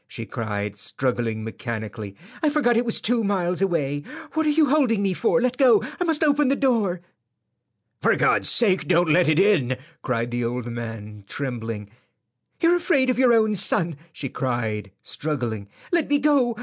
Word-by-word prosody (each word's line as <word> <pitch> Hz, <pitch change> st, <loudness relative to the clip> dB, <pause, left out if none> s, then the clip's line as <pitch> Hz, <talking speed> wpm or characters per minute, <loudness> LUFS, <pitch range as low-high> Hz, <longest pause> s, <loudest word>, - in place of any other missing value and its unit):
she 115 Hz, -, -7 dB
cried, 105 Hz, -4 st, -4 dB
struggling 115 Hz, 0 st, -2 dB
mechanically. 110 Hz, -3 st, -6 dB, 0.3 s
"I 310 Hz, -, +3 dB
forgot 285 Hz, -5 st, +2 dB
it 235 Hz, +2 st, +1 dB
was 230 Hz, -, +1 dB
two 235 Hz, 0 st, +1 dB
miles 185 Hz, -3 st, -1 dB
away. 145 Hz, -7 st, 0 dB, 0.3 s
What 315 Hz, 0 st, 0 dB
are -, -, +4 dB
you 300 Hz, 0 st, +3 dB
holding 255 Hz, -8 st, +2 dB
me 195 Hz, -1 st, +1 dB
for? 235 Hz, +6 st, +1 dB
Let 250 Hz, +1 st, 0 dB
go. 250 Hz, -6 st, +5 dB, 0.2 s
I -, -, +1 dB
must 325 Hz, -3 st, +1 dB
open 295 Hz, -1 st, +3 dB
the 275 Hz, -, +2 dB
door." 220 Hz, -11 st, 0 dB, 1.0 s
"For -, -, +3 dB
God's -, -, +2 dB
sake 195 Hz, -6 st, +3 dB
don't 175 Hz, -1 st, +3 dB
let 170 Hz, 0 st, +4 dB
it 155 Hz, -, +2 dB
in," 165 Hz, -11 st, +3 dB, 0.2 s
cried 120 Hz, -1 st, -2 dB
the 120 Hz, 0 st, -2 dB
old 120 Hz, +1 st, -3 dB
man, 110 Hz, -3 st, -7 dB
trembling. 115 Hz, -6 st, -5 dB, 0.7 s
"You're 340 Hz, +1 st, +4 dB
afraid 280 Hz, -7 st, +2 dB
of 250 Hz, -, -3 dB
your 255 Hz, -2 st, +5 dB
own 220 Hz, -2 st, +3 dB
son," 170 Hz, -3 st, +2 dB, 0.2 s
she 145 Hz, -, -6 dB
cried, 115 Hz, -6 st, -3 dB
struggling. 120 Hz, -9 st, -4 dB, 0.2 s
"Let 340 Hz, -4 st, +1 dB
me 290 Hz, -, +3 dB
go. 275 Hz, -5 st, +2 dB
175 Hz, 175 wpm, -23 LUFS, -, 1.0 s, go